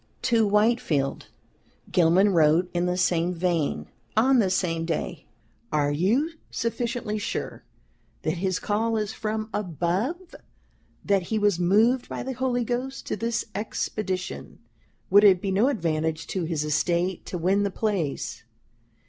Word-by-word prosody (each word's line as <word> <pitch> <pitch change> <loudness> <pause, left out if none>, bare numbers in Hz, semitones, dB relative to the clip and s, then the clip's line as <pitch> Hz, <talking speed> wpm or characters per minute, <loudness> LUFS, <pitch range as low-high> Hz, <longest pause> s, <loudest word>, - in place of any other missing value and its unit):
To 230 -4 +3
Whitefield, 210 - +1 0.6
Gilman 185 +4 +4
wrote 165 +2 +3
in 175 0 0
the 180 0 0
same 175 -1 +1
vein, 170 -3 0 0.3
on 255 +3 +5
the 200 -4 +3
same 170 -3 0
day: 165 -1 -3 0.4
"Are 145 -1 +1
you 220 - +1 0.2
sufficiently 230 -1 -2
sure - - -4 0.6
that 155 +2 -1
his 185 -1 0
call 225 +2 0
is 210 0 -2
from 215 0 -3
above, 205 - -2 0.7
that 200 -1 +3
he 215 +5 -2
was 205 -4 +2
moved 220 +8 +3
by - - -4
the 265 - -4
Holy 250 -1 0
Ghost 250 +3 -3
to - - -2
this 230 +2 -2
Expedition? 195 -2 -4 0.5
Would 205 +2 +7
it 190 -3 +7
be 195 +1 -2
no 205 +6 +3
advantage 160 - -1
to 185 -3 -1
his 160 -2 -1
Estate 170 +4 0
to 180 - -4
win 185 +4 +2
the 200 - +1
place? 190 -8 -2
195 Hz, 140 wpm, -25 LUFS, 170-225 Hz, 0.7 s, Would